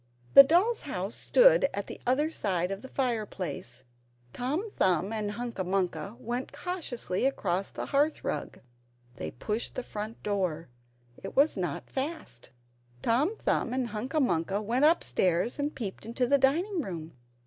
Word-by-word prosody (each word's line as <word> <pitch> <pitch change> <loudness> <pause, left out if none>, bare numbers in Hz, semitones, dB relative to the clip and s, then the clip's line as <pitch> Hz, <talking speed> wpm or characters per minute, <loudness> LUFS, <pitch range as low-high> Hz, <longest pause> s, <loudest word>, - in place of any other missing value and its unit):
The - - +13
doll's 360 - +3
house 200 -6 -4
stood - - +5
at 200 0 -2
the - - -9
other 295 +5 +2
side 185 - -1
of 195 +1 -4
the - - -9
fire 240 -5 -1
place. 140 -10 -5 0.5
Tom 295 - -2
Thumb 185 - +1
and 210 -2 -2
Hunca 235 -3 -4
Munca 195 +3 -2
went 240 +3 -4
cautiously 265 - -2
across 195 -7 -1
the - - -5
hearthrug. 290 +3 -1 0.6
They 80 - -4
pushed 210 - -3
the 255 - -3
front 215 0 -6
door 180 -7 -1 0.5
it - - -7
was 285 +3 +4
not 175 -7 -4
fast. 275 - -4 0.5
Tom 280 - +2
Thumb 240 - +1
and 255 -2 -1
Hunca 245 +8 -2
Munca 190 - +1
went 235 +7 +2
upstairs 225 - +2
and 290 +1 -1
peeped 205 -6 -5
into 235 +3 -1
the 280 +3 +3
dining 335 +8 +2
room. 165 - -6
230 Hz, 150 wpm, -29 LUFS, 190-280 Hz, 0.6 s, The